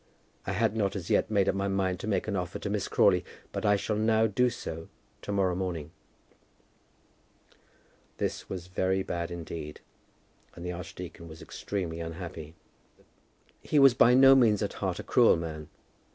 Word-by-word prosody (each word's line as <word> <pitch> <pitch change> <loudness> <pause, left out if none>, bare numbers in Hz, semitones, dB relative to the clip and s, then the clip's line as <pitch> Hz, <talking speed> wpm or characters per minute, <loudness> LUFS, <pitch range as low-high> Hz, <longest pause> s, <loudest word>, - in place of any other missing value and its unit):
I 95 - -1
had 110 +2 +1
not 100 -3 0
as 90 -4 -5
yet - - +2
made 100 -3 +2
up - - +3
my 100 +1 -1
mind 95 -2 0
to 100 - -6
make 100 -2 0
an 105 - -1
offer 90 -1 -3
to 100 - -4
Miss 100 -2 -1
Crawley, 90 -2 +3 0.3
but 110 - -2
I 105 - +5
shall 105 +1 -2
now 110 +1 +3
do 125 +4 +2
so 80 -7 -7 0.3
to - - -5
morrow 95 -3 +1
morning." 85 -4 -4 2.3
This - - -3
was 90 -2 -5
very 95 +1 0
bad 85 -2 -3
indeed, 80 -3 -7 0.8
and 85 - -8
the 90 - -2
archdeacon 90 -1 -8
was 80 0 -11
extremely 90 -5 -4
unhappy. 80 -1 -7 1.1
He 150 - -1
was 135 -3 +7
by 120 +1 +5
no 135 +1 +8
means 115 -6 +4
at - - -3
heart - - -1
a - - -6
cruel - - +5
man. 80 -2 -6
95 Hz, 170 wpm, -29 LUFS, 85-105 Hz, 2.3 s, no